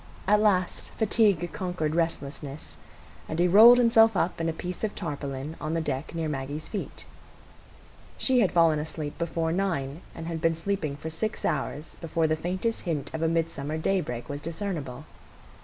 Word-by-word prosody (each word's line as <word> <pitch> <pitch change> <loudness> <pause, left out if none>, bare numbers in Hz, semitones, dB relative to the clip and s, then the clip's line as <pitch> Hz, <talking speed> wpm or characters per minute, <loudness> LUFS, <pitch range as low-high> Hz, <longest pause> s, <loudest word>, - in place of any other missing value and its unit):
At 210 +2 +4
last 190 -4 +1
fatigue 205 -6 +2
conquered 175 -5 -2
restlessness, 150 -3 -3 0.5
and 160 - -3
he 175 +1 +4
rolled 225 +7 +9
himself 225 -3 +5
up 170 -1 0
in 165 - 0
a - - +1
piece 180 +4 -6
of 215 - -1
tarpaulin 145 -3 -5
on 155 +2 -2
the - - +1
deck 145 0 -3
near 165 -1 -1
Maggie's 145 +1 -4
feet. 205 - -6 1.1
She 260 -2 +3
had 195 -8 +3
fallen 165 -3 +4
asleep 150 -1 -5
before 165 -1 -1
nine, 170 -5 -1
and 165 - -6
had 165 -1 -4
been 165 0 +2
sleeping 165 -4 -2
for 160 +3 -6
six 215 +7 -2
hours 150 +1 -2
before 165 0 0
the 155 0 +2
faintest 185 +8 -2
hint 150 -6 -3
of 160 - -3
a 165 - +2
midsummer 160 -2 -1
daybreak 160 -8 -1
was 145 0 -5
discernible. 160 -5 -5
165 Hz, 170 wpm, -27 LUFS, 150-185 Hz, 1.1 s, rolled